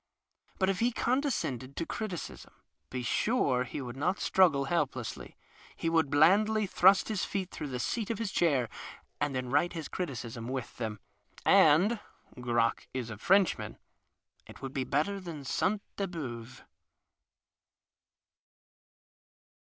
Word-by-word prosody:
But 190 - +2
if 190 - -4
he 240 +2 +2
condescended 230 - -1
to 165 - -2
criticism, 195 -4 -6 0.3
be 125 -1 -4
sure 130 - +1
he 130 - -5
would 125 -1 -6
not 180 +8 0
struggle 160 -8 +4
helplessly. 135 -6 -2 0.4
He 165 - -1
would 160 -3 +3
blandly 205 +9 +4
thrust 190 +1 +5
his 215 -4 -1
feet 190 -2 -3
through 150 - -5
the 130 -2 -4
seat 220 - -2
of 230 - -1
his 225 -3 -3
chair, 140 -11 +2 0.5
and 145 -2 -1
then 125 -1 -3
write 150 +5 +2
liis 165 -3 -6
criticism 120 -9 -4
with 130 -1 -2
tliem. 110 -3 -5 0.5
And 185 +10 +5 0.4
(Crock 120 -1 +1
is 120 -3 -3
a 110 - -6
Frenchman) 195 - +2 0.7
it - - -12
would 135 0 -6
be 130 -2 -1
better 155 +10 0
than 165 -6 -7
Sainte 200 +9 0
Beuve. 130 - -5
155 Hz, 135 wpm, -30 LUFS, 130-195 Hz, 0.7 s, thrust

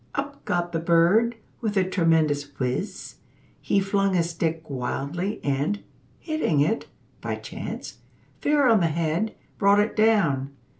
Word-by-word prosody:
Up 280 0 -4
got 175 0 -1
the 165 - -1
bird 175 +8 +3 0.3
with 215 -3 -1
a 190 - +5
tremendous 160 -5 +2
whizz! 125 -1 -3 0.4
He 200 - +2
flung 195 0 +1
his 170 -1 +1
stick 165 -1 -2
wildly, 140 - -3
and, 145 +9 -1 0.3
hitting 310 - 0
it, 160 +11 +1 0.3
(by - - -2
chance), - - -7 0.4
fair 290 -2 +3
on 225 -3 +5
the 170 - +3
head, 165 +6 -1 0.2
brought 200 0 +5
it 210 +2 +1
down. 170 -12 +2
175 Hz, 140 wpm, -25 LUFS, 155-210 Hz, 0.4 s, a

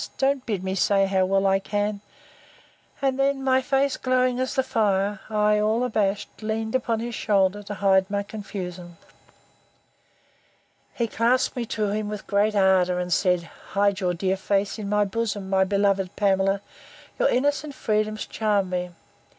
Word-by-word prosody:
Don't 270 -1 +1
bid 200 -5 -2
me 190 0 -2
say 195 +1 +3
how 190 -1 +1
well 195 +1 +1
I 195 0 +3
can—And 210 +6 -5
then, 275 0 +1
my 260 0 +3
face 275 +1 +1
glowing 255 -1 +1
as 260 0 -2
the 265 - +2
fire, 205 -4 0
I, 210 -1 +2
all 220 +3 +1
abashed, 210 -4 -1
leaned 220 +1 -3
upon 235 -3 0
his 240 0 -4
shoulder, 200 -2 +1
to 205 0 -7
hide 190 -1 +3
my 200 0 -1
confusion. 180 -4 -7 2.0
He 235 - 0
clasped 235 +3 +1
me 240 -2 -3
to 210 -2 -1
him 210 +1 -2
with 210 -2 -6
great 210 +1 +1
ardour, 190 -2 +3
and 180 -1 -1
said, 180 +2 +2 0.3
Hide 200 0 +2
your 180 -2 0
dear 190 +2 0
face 200 +2 -1
in 200 -2 -4
my 210 0 +2
bosom, 205 -2 -3
my 190 0 +4
beloved 195 -1 0
Pamela! 195 -1 +1 0.6
your - - +3
innocent 285 +2 0
freedoms 215 0 -1
charm 205 -4 0
me! 180 0 -2
205 Hz, 160 wpm, -24 LUFS, 195-230 Hz, 2.0 s, my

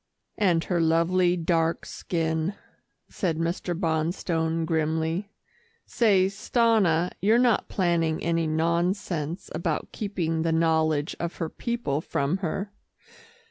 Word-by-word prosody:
"And 175 -5 +3
her 175 -2 0
lovely 175 +2 +3
dark 165 -1 0
skin," 160 +2 -2 0.5
said 170 -6 -2
Mr. 170 +1 -2
Bonstone 165 -1 0
grimly. 160 +4 -1 0.6
"Say, 200 -6 +3
Stanna 195 -4 +2
you're 215 +4 +4
not 245 -3 +2
planning 170 -4 +1
any 165 -1 +1
nonsense 170 +1 -1
about 165 -3 -2
keeping 170 -6 -2
the 165 0 +1
knowledge 160 -2 +1
of 170 +1 -3
her 165 -2 -3
people 235 - -2
from 145 +3 -1
her?" 195 +2 -3
170 Hz, 110 wpm, -26 LUFS, 160-185 Hz, 0.6 s, you're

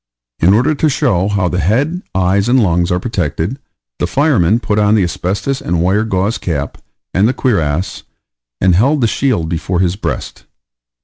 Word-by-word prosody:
In 95 +5 +4
order 130 +8 +2
to 155 +1 +1
show 95 -8 +1
how 100 -3 0
the 90 +1 -1
head, 135 - 0
eyes, 95 +4 +1
and 130 +1 +4
lungs 85 -2 +1
are 90 - +1
protected, 95 - -3 0.4
the - - 0
fireman 120 - +2
put 105 -3 -1
on 105 +1 +3
the 105 - +3
asbestos 100 +9 -2
and 85 0 -1
wire 95 +5 +1
gauze 100 +1 -1
cap, 75 -5 -3 0.3
and 100 +4 +3
the 125 - +1
cuirass, 90 - -1 0.6
and 95 -1 +3
held 135 - +2
the 115 - +3
shield 110 -9 0
before 85 +2 -2
his 90 -1 +1
breast. 105 - -5
100 Hz, 175 wpm, -15 LUFS, 90-120 Hz, 0.6 s, In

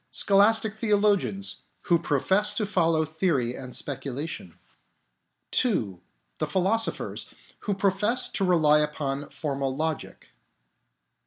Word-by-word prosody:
Scholastic 205 +2 +3
theologians, 205 -2 0 0.2
who 170 -1 +2
profess 195 +10 +1
to 215 - 0
follow 165 -5 +1
theory 155 -6 -1
and 125 -1 -7
speculation. 135 - -5 1.1
II. 110 - -1 0.4
The - - -1
Philosophers, 200 +5 -1 0.3
who 205 - -2
profess 200 +5 +1
to 195 - -1
rely 155 -5 +4
upon 145 -2 -2
formal 135 -3 -3
logic. 160 0 -4
170 Hz, 100 wpm, -26 LUFS, 145-205 Hz, 1.1 s, rely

